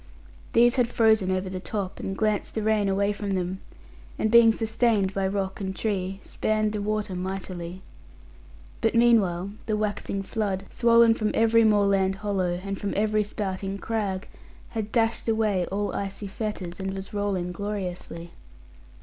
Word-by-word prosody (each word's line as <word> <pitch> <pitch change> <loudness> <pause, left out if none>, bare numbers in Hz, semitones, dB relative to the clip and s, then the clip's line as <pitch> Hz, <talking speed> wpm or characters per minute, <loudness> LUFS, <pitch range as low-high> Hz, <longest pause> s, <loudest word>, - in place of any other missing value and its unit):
These 240 +2 +5
had 245 -2 +3
frozen 220 -5 +3
over 185 0 0
the 185 0 -4
top, 195 0 -4
and 195 0 -4
glanced 215 -1 0
the 220 - -1
rain 215 -2 +2
away 200 +1 +1
from 200 -1 -3
them, 185 +1 -3 0.6
and 220 - 0
being 235 -1 +8
sustained 220 -3 +1
by 195 -1 0
rock 195 0 -2
and 190 -1 -3
tree, 195 -3 -2
spanned 215 0 0
the 210 - -2
water 210 -1 -1
mightily. 185 -1 -5 1.0
But 225 0 +1
meanwhile 200 -6 +3 0.2
the 215 -1 +1
waxing 205 -2 -2
flood, 195 -2 -2
swollen 235 -1 +5
from 215 -2 -1
every 230 0 +4
moorland 200 -3 +3
hollow 190 -3 -1
and 195 -1 -4
from 205 - -2
every 215 +1 +2
spouting 195 -1 -3
crag, 200 -3 -2 0.4
had 220 -2 -4
dashed 225 -1 +1
away 215 -5 +1
all 205 +2 -2
icy 200 +1 -4
fetters, 195 -3 -5
and 190 0 -3
was 195 +3 -7
rolling 200 -3 -1
gloriously. 180 -3 -5
200 Hz, 155 wpm, -26 LUFS, 190-220 Hz, 1.0 s, being